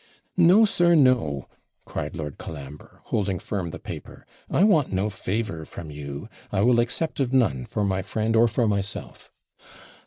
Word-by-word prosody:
'No, 185 +5 +6
sir, 175 -4 +3
no!' 125 - +3 0.4
cried - - -5
Lord 75 -3 -6
Colambre, 75 -1 -9
holding 100 -3 -1
firm 90 -2 -3
the - - -7
paper. - - -9 0.2
'I 180 - +3
want 170 -10 +4
no 100 +3 0
favour 100 -3 -3
from 80 0 -9
you. 70 -1 -7 0.2
I 95 - +1
will 120 0 +5
accept 125 +8 -1
of 130 -3 +1
none 70 - +2
for 105 - -2
my 95 -1 0
friend 110 +4 -1
or 115 +1 +6
for 115 +1 +1
myself.' 100 -1 -3
105 Hz, 160 wpm, -25 LUFS, 80-130 Hz, 0.4 s, No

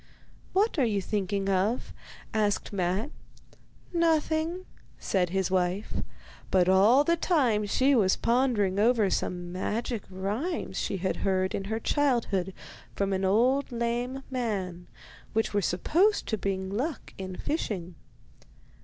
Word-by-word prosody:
'What 400 -3 +2
are - - +4
you 215 -4 +1
thinking 195 0 -2
of?' 195 +5 0 0.4
asked 210 -2 0
Matte. 190 - -1 0.8
'Nothing,' 330 +1 +1 0.3
said 180 -3 0
his 190 0 -1
wife; 185 +2 0 0.5
but 180 -2 +3
all 205 +9 +6
the 335 +3 +3
time 255 - +2
she 260 +7 +3
was 200 -7 +4
pondering 230 -6 +1
over 220 -3 +3
some 175 -1 -2
magic 220 +5 -2
rhymes 205 - -3
she 195 - -2
had 185 +1 -1
heard 185 -1 0
in 195 - -3
her 220 +3 -2
childhood 235 - +1 0.4
from 200 -1 0
an 190 0 -1
old 250 +8 +2
lame 240 +3 -2
man, 195 -8 -3 0.5
which 225 -1 0
were 205 - +2
supposed 345 - +2
to 220 - +1
bring 190 -2 -3
luck 265 +9 -3
in 185 -1 -5
fishing. 185 - -3
210 Hz, 130 wpm, -28 LUFS, 190-255 Hz, 0.8 s, all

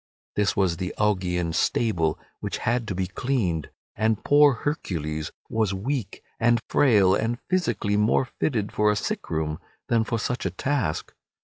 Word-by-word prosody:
This 105 -1 +1
was 90 -4 +1
the 90 +1 -4
Augean 90 -5 0
stable 80 -9 +1 0.2
which - - -3
had 120 0 +1
to 100 - -3
be 95 0 0
cleaned, 95 - -1 0.3
and 110 0 +1
poor 145 -1 +6
Hercules 80 - -3 0.2
was 110 -4 0
weak 120 +3 -3 0.2
and 120 +1 +4
frail 105 -9 +4
and 115 +4 0
physically 120 - +1
more 105 +5 +3
fitted 115 -5 -2
for 105 0 +2
a 105 - +2
sick 100 - -3
room 80 -1 -2 0.3
than 115 -1 +3
for 115 +1 -1
such 120 +3 -2
a 95 - 0
task. 110 - -2
105 Hz, 155 wpm, -25 LUFS, 90-120 Hz, 0.3 s, poor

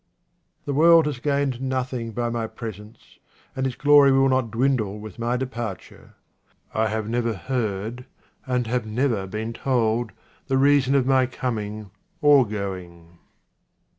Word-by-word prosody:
This 145 - -2
world 165 +2 +6
has 145 -4 -3
gained 140 -2 -1
nothing 130 -3 -3
by 120 +1 -2
my 115 -1 -2
presence 110 -1 -10 0.4
and 130 0 0
its 125 - -5
glory 145 -1 +6
will 135 0 +4
not 130 -3 +1
dwindle 115 -3 0
with 105 0 -10
my 120 +2 0
depar 120 -6 -4
ture. - - -18 0.6
I 110 0 +1
have 110 0 -3
never 115 -1 -1
heard, 115 +2 -3 0.4
and 125 -1 0
have 120 0 -2
never 110 -3 -1
been 110 +4 -4
told, 115 -3 0 0.4
the 135 -1 +1
reason 140 -1 +4
of 135 -2 +3
my 130 -1 +3
coming 110 -5 -4 0.3
or 145 -6 +5
going. 90 -5 -7
120 Hz, 145 wpm, -23 LUFS, 110-130 Hz, 0.6 s, world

